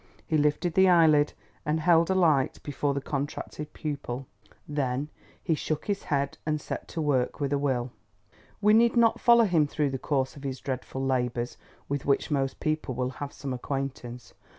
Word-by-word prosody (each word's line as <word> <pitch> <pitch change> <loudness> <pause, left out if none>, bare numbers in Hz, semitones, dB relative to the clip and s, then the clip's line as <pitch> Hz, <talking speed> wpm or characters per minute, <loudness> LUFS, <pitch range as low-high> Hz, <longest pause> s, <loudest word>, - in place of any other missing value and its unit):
He 160 - -1
lifted 150 +3 +1
the 190 +1 +5
eyelid, 155 -4 +5 0.3
and 150 +2 0
held 165 +1 +4
a 190 - +2
light 155 -8 +3
before 145 -1 -1
the 140 - -1
contracted 145 +1 -4
pupil. 140 -4 -5 0.4
Then 140 -1 -1 0.3
he 165 - +1
shook 155 0 -2
his 200 -1 -2
head 140 -1 -1
and 155 0 -1
set - - -6
to 165 - -4
work 130 -4 0
with 140 -1 -1
a 140 - +1
will. 130 -3 -1 0.7
We 210 +1 +5
need 235 +2 +4
not 230 -1 +4
follow 235 -1 +6
him 165 -7 +3
through 145 -1 -1
the 135 - -3
course 135 -2 -1
of 140 - -11
his 135 -2 -4
dreadful 130 0 -4
labours, 125 -2 -1 0.3
with 140 -1 -3
which 140 +2 +1
most 135 -2 0
people 155 -4 -1
will 125 +1 -1
have 145 0 -3
some 135 -1 -5
acquaintance. 125 -2 -5
145 Hz, 180 wpm, -27 LUFS, 135-155 Hz, 0.7 s, follow